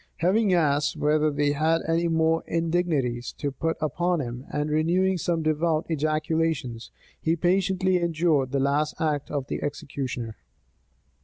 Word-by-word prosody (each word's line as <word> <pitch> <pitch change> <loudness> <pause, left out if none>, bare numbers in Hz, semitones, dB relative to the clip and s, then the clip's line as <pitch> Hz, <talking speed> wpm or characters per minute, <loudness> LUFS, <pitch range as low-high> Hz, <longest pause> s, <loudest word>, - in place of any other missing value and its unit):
Having 195 +4 +2
asked 145 -3 +1
whether 155 +1 +2
they 145 0 +1
had 160 +3 +1
any 165 +1 +1
more 160 0 +2
indignities 160 -8 0
to 145 - -3
put 160 +5 -2
upon 170 +3 0
him, 125 -1 -5
and 150 0 -1
renewing 175 +4 +2
some 165 0 -1
devout 155 +1 +1
ejaculations, 155 -5 -1 0.3
he 165 +1 +1
patiently 185 +2 +2
endured 160 -5 +1
the 140 - +1
last 145 +3 0
act 150 -3 -1
of 140 -3 -2
the - - -4
executioner. 130 -5 -4
155 Hz, 140 wpm, -26 LUFS, 145-170 Hz, 0.3 s, Having